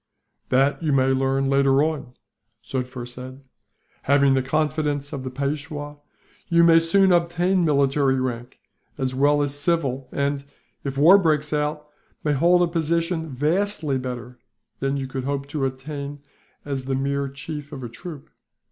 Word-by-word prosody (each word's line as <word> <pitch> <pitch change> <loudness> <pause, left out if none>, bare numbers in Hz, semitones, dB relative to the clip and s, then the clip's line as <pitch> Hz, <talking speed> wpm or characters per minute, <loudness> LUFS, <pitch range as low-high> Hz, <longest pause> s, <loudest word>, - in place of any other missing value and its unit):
"That 135 +4 +2
you 155 -3 0
may 135 -1 +3
learn 135 +1 +1
later 135 0 +3
on," 150 -6 -3 0.5
Sufder 125 -2 -4
said. 130 +2 -9 0.6
"Having 140 0 +4
the 135 - +2
confidence 150 0 -1
of 135 - -4
the 130 - -4
Peishwa, 145 +2 -4 0.5
you 170 -1 +4
may 165 -1 +7
soon 190 +4 +3
obtain 175 +2 +2
military 140 -3 +2
rank, 125 -1 -4 0.4
as 130 -2 -1
well 145 +2 +3
as 140 -1 -1
civil 145 -4 -1
and, 140 0 -1 0.4
if 135 -1 -4
war 175 +8 +7
breaks 155 -4 +1
out, 150 0 -1 0.4
may 150 - +1
hold 175 +5 +4
a - - +2
position 165 0 -1
vastly 155 +1 0
better 125 -1 -6 0.4
than 135 +1 -1
you 135 - -3
could 130 -1 -5
hope 140 0 -2
to 145 -2 -1
attain 140 +2 -6
to 140 - -29 0.4
as 135 -2 -3
the 135 0 -1
mere 140 +1 -1
chief 150 +2 -7
of 135 -3 -7
a - - -4
troop." 145 +5 -10
140 Hz, 155 wpm, -23 LUFS, 135-155 Hz, 0.6 s, may